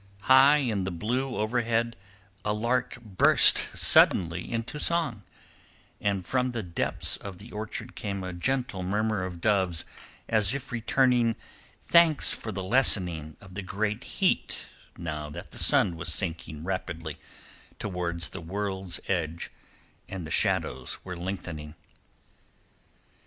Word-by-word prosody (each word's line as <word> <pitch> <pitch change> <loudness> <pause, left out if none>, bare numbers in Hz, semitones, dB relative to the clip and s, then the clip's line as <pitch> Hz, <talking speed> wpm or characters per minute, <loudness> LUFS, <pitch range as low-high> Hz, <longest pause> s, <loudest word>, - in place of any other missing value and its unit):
High 135 +5 +7
in 115 -9 0
the 95 - -2
blue 125 +9 -2
overhead 115 +1 0 0.5
a 105 - 0
lark 120 +3 0
burst 100 -4 +5
suddenly 85 0 +4
into 115 +5 -3
song, 155 -10 0 0.8
and 100 -3 -1
from 130 +3 +1
the 115 -2 -3
depths 85 -2 -1
of 100 -3 -8
the 105 +6 -12
orchard 110 +3 -5
came 100 -2 -4
a 90 -1 -5
gentle 125 +1 -1
murmur 105 +2 0
of 90 -2 -6
doves 95 -5 +1 0.4
as 110 +2 +3
if 140 - -6
returning 120 0 +2 0.5
thanks 170 -4 +5
for 110 - -5
the 95 -2 -4
lessening 90 - +2
of 95 -2 -14
the 100 - -4
great 105 +4 -2
heat 190 -2 0 0.3
now 75 -3 -4
that 75 - -9
the - - -8
sun 85 - +4
was 85 +1 -4
sinking 80 -1 -4
rapidly 85 -4 -4 0.6
towards 85 -3 -2
the - - -8
world's 95 0 -3
edge 85 -3 -2 0.6
and 95 -4 -5
the 80 - -7
shadows 65 -3 0
were 90 -1 -6
lengthening. 85 -4 -6
100 Hz, 130 wpm, -28 LUFS, 85-115 Hz, 0.8 s, High